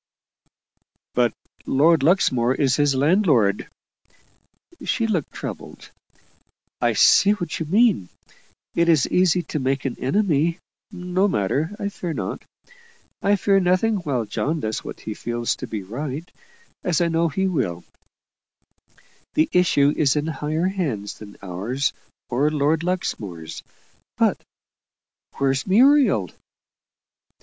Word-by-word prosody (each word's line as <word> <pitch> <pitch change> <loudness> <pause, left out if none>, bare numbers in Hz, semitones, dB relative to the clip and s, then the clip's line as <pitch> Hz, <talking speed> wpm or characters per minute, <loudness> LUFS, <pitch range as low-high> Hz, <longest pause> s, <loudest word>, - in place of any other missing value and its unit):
"But 120 -3 +1 0.3
Lord 155 +3 +4
Luxmore 130 -7 +2
is 135 -3 +2
his 145 -2 +2
landlord." 140 - +2 1.1
She 230 - 0
looked 185 -10 -1
troubled. - - -8 0.9
"I - - +2
see 200 +1 +5
what 175 -7 -4
you 160 - -3
mean. 200 - +3 0.6
It 170 0 +2
is 155 -5 +4
easy 180 -1 +2
to 150 - -4
make 135 0 -1
an 130 - -2
enemy. 165 +1 +1 0.3
No 185 0 0
matter 155 - -1
I 205 -3 -3
fear 175 -4 -5
not. - - -4 0.8
I 200 +1 +3
fear 195 0 +3
nothing 185 +4 +2
while 140 - -2
John 155 +9 -2
does 110 -5 -3
what - - -8
he 110 - -5
feels 120 +2 -2
to - - -6
be 105 -3 -5
right 140 - -5 0.6
as 175 -4 +1
I 170 - +2
know 165 0 +1
he 190 +6 -1
will; 120 - -1 1.5
the 155 - +3
issue 150 -5 +3
is 145 -2 +2
in 150 0 0
higher 155 +2 -2
hands 140 - -3
than 100 -1 -12
ours 110 +10 -2 0.3
or 135 +5 +1
Lord 155 +1 +1
Luxmore's. 100 - -4 0.6
But - - +2 1.0
where's 135 +2 0
Muriel?" 225 - +4
155 Hz, 125 wpm, -22 LUFS, 130-180 Hz, 1.5 s, see